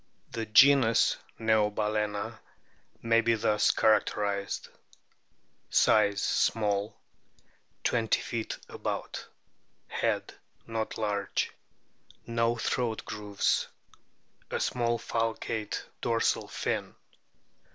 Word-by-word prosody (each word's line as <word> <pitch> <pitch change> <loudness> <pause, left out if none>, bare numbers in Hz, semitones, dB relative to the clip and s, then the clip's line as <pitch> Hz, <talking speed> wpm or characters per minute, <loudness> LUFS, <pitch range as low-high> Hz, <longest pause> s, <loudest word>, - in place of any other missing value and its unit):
The 115 -1 -4
genus 120 0 +6 0.2
NEOBAL/ENA 105 0 0 0.6
may 115 0 +4
be 115 0 +2
thus 105 -1 +2
characterised: 100 -2 +1 1.0
Size 100 -2 +4
small, 105 0 +1 0.9
20 115 -3 +2
feet 115 -2 -4
about. - - -5 0.6
Head - - -1 0.3
not 110 -1 -3
laree. 105 -2 -1 0.7
No 115 0 +1
o - - -6
throat 115 -1 -1
grooves. 105 -1 0 0.8
A - - -2
small 120 -1 0
falcate 115 -2 -2 0.2
dorsal 115 -1 +1
fin. - - -3
110 Hz, 80 wpm, -29 LUFS, 105-115 Hz, 1.0 s, genus